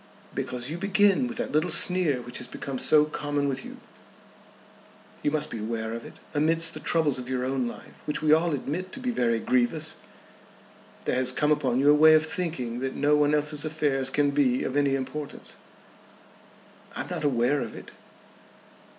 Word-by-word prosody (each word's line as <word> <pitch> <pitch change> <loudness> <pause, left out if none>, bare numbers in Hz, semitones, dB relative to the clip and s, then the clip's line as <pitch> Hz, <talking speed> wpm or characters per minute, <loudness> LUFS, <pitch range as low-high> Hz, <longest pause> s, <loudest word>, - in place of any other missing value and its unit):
"Because 125 0 -4
you 170 - -5
begin 205 +5 +3
with 240 -2 -6
that 245 - -3
little 155 +4 +1
sneer 170 -9 +3
which 120 - -6
has 125 - -7
become 135 -2 -6
so 150 -1 +5
common 145 -1 -2
with 135 -1 -3
you. - - -10 1.4
You - - +1
must 150 0 -1
be 115 - -5
aware 110 +1 -3
of 115 0 -6
it. - - -12 0.2
Amidst 165 +2 +3
the - - -6
troubles 155 -6 +1
of 125 0 -7
your 130 -1 -1
own 130 -2 -1
life, - - -9
which 150 - -2
we 155 0 +3
all 160 0 +2
admit 175 +7 -4
to - - -6
be 250 -1 -2
very 115 - +1
grievous, 130 +7 0 1.1
there - - 0
has 130 -1 +1
come 150 +3 +1
upon 130 -5 +1
you 145 +2 +5
a - - +7
way 155 +1 +7
of 155 0 +3
thinking 155 -9 -3
that 130 +1 -3
no 145 +1 +3
one 150 0 +3
else's 150 0 0
affairs 145 -4 -1
can 145 +1 +1
be 135 -3 +2
of 135 - -3
any 140 -1 +2
importance." 135 +2 -6 1.4
"I - - -2
am - - -6
not - - -3
aware 135 0 +1
of - - -6
it." - - -11
145 Hz, 190 wpm, -26 LUFS, 130-155 Hz, 1.4 s, a